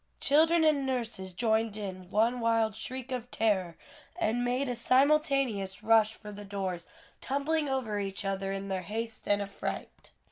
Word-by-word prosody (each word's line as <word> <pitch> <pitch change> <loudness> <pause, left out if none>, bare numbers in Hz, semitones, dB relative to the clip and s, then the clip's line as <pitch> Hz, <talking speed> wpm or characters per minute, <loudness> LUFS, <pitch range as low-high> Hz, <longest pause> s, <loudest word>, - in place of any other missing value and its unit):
Children 320 +3 +4
and 305 -3 +3
nurses 235 -8 -3
joined 220 +1 0
in 185 -3 -6
one 230 +5 +2
wild 225 -2 +2
shriek 260 +3 -6
of 250 -1 -4
terror, 190 -8 0 0.4
and 245 -9 0
made 250 +3 0
a 250 - -1
simultaneous 255 -6 +2
rush 220 0 +4
for 210 - -10
the 205 0 -8
doors, 190 -4 -4 0.3
tumbling 290 +2 0
over 240 -6 -1
each 195 0 -4
other 195 0 -2
in 195 0 -4
their 190 -1 -2
haste 225 +4 -5
and 205 0 +3
affright. 200 0 -6
225 Hz, 155 wpm, -30 LUFS, 200-260 Hz, 0.4 s, Children